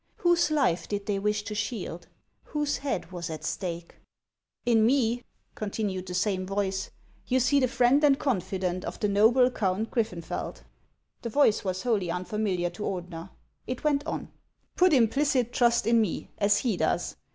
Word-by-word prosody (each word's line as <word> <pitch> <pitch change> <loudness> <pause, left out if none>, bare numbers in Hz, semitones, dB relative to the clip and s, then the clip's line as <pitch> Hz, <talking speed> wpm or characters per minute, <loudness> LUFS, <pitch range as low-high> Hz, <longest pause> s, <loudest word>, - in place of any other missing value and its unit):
Whose 345 -3 +3
life 275 - +1
did 205 -1 -3
they 200 -2 -1
wish 210 +1 0
to 210 - -5
shield? 205 -5 -4 0.4
Whose 295 -1 -1
head 260 - -3
was 175 -2 -5
at 155 -1 -6
stake? 170 -1 -4 0.3
" - - -53
In 230 -2 +4
me," 245 -1 +2 0.3
continued 200 -3 -3
the 180 - -4
same 185 0 0
voice, 190 0 -2 0.2
" - - -33
you 260 - +2
see 270 +3 +3
the 255 - +3
friend 250 +4 +3
and 280 -2 +5
confidant 185 - -1
of - - -6
the 210 - +1
noble 230 +5 +4
Count 210 -1 -1
Griffenfeld." 180 -9 -3 0.6
The 235 - -4
voice 225 -3 +3
was 185 -1 -2
wholly 210 -8 0
unfamiliar 180 0 -1
to 195 - -11
Ordener. 180 -2 -5 0.4
It 255 0 -4
went 290 -2 +2
on: - - -4 0.2
" - - -46
Put 365 0 +4
implicit 255 -1 +2
trust 235 -3 +3
in 230 0 +4
me, 210 -6 -3
as 205 0 +4
he 220 -4 0
does. - - 0
210 Hz, 175 wpm, -27 LUFS, 185-250 Hz, 0.6 s, and